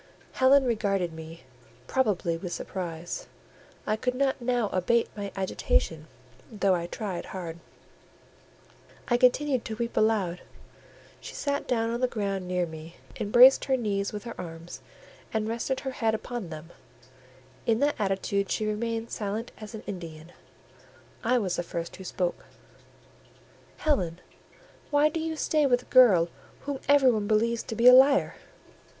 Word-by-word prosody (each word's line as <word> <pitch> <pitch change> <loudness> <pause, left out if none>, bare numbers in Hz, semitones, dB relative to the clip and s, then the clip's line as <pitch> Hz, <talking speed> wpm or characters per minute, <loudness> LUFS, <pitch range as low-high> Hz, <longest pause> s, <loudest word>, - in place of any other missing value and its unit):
Helen 270 +1 +5
regarded 195 -7 0
me, 160 -2 -10 0.4
probably 200 - 0
with 175 +1 -6
surprise: 175 -3 -5 0.6
I 215 - +1
could 250 +3 -2
not 270 0 0
now 240 -3 0
abate 230 +6 +1
my 200 -1 -5
agitation, 165 -4 -1 0.4
though 200 -3 +2
I 170 -1 -1
tried 190 -2 -5
hard; 170 -3 -7 1.5
I 240 - +4
continued 255 +1 +3
to 220 - -4
weep 235 +1 -4
aloud. 205 -5 +1 0.8
She - - -10
sat 285 -1 -2
down 230 -2 0
on 235 - -2
the 255 - +3
ground 200 -5 -3
near 180 -1 0
me, 160 +1 -10 0.2
embraced 245 +6 +6
her 265 -1 +2
knees 200 -4 -1
with 210 -1 -6
her 235 - -6
arms, 165 0 -9 0.5
and 220 -1 -1
rested 235 +4 -2
her 265 - -3
head 225 -3 0
upon 225 -4 -5
them; 160 +1 -9 1.0
in 225 -1 +3
that 290 +1 +3
attitude 200 0 -1
she 215 - -1
remained 225 +2 -2
silent 215 +3 -4
as 215 +1 -8
an 215 - -8
Indian. 165 -3 -8 0.9
I 250 +2 +3
was 190 -6 -1
the - - 0
first 170 -1 -5
who 190 - -9
spoke— 180 -1 -3 1.3
"Helen, 180 - 0 0.7
why 295 +1 +4
do 325 - -3
you 320 0 -3
stay 305 -1 +2
with 245 -1 +2
a - - -20
girl 200 -10 +7 0.3
whom 280 -1 -4
everybody 255 -7 +4
believes 225 +2 +2
to 225 - -6
be 235 +2 +4
a 250 - +11
liar?" 275 +2 +6
215 Hz, 150 wpm, -27 LUFS, 180-250 Hz, 1.5 s, a